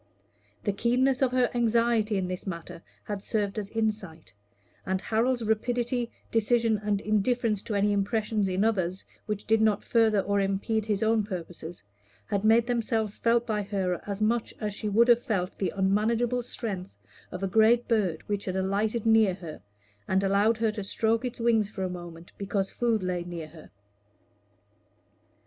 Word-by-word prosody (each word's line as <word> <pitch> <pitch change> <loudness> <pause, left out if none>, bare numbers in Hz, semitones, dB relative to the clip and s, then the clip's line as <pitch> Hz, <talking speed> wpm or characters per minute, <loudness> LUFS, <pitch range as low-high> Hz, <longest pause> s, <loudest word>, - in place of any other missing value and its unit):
The 205 - 0
keenness 250 +5 +2
of 260 -2 +3
her 255 -1 +3
anxiety 230 -2 +2
in 185 -1 -1
this 180 +2 -5
matter 170 -1 -6 0.2
had 205 -2 -5
served 205 0 -1
as 200 -1 -5
insight; 210 - -3 0.5
and 190 0 -1
Harold's 235 +4 0
rapidity, 240 +2 0 0.2
decision, 225 -1 +2
and 205 -1 +1
indifference 215 0 +1
to 210 - -4
any 205 +1 +2
impressions 210 0 0
in 185 +2 +1
others, 190 -4 0 0.2
which 210 -1 -3
did 220 0 +3
not 215 -2 +2
further 220 -3 +3
or 200 +1 0
impede 200 +3 -1
his 210 -1 0
own 220 0 +3
purposes, 175 - -7 0.4
had 200 - -1
made 225 +2 +5
themselves 225 -3 -1
felt 235 0 +2
by 215 -3 -1
her 195 -3 -2
as 200 +1 -2
much 230 +1 0
as 210 -2 -3
she 210 +1 -3
would 230 +4 +4
have 240 -1 +5
felt 190 -6 -2
the 190 - 0
unmanageable 225 +5 +1
strength 195 - -6 0.3
of 180 - -6
a - - +1
great 225 +4 +4
bird 195 -9 0
which 205 -1 -2
had 185 - -3
alighted 205 +4 0
near 220 -4 +4
her, 165 -5 -9 0.5
and 190 +1 +1
allowed 200 +3 +3
her 220 -1 +1
to 210 -1 -5
stroke 225 +4 0
its 250 -1 -4
wing 230 -1 +3
for 205 -2 -5
a 185 - -1
moment 175 -1 -9
because 195 -1 -1
food 230 -4 0
lay 180 -1 -1
near 170 -3 -7
her. 155 0 -14
210 Hz, 170 wpm, -27 LUFS, 195-230 Hz, 0.5 s, made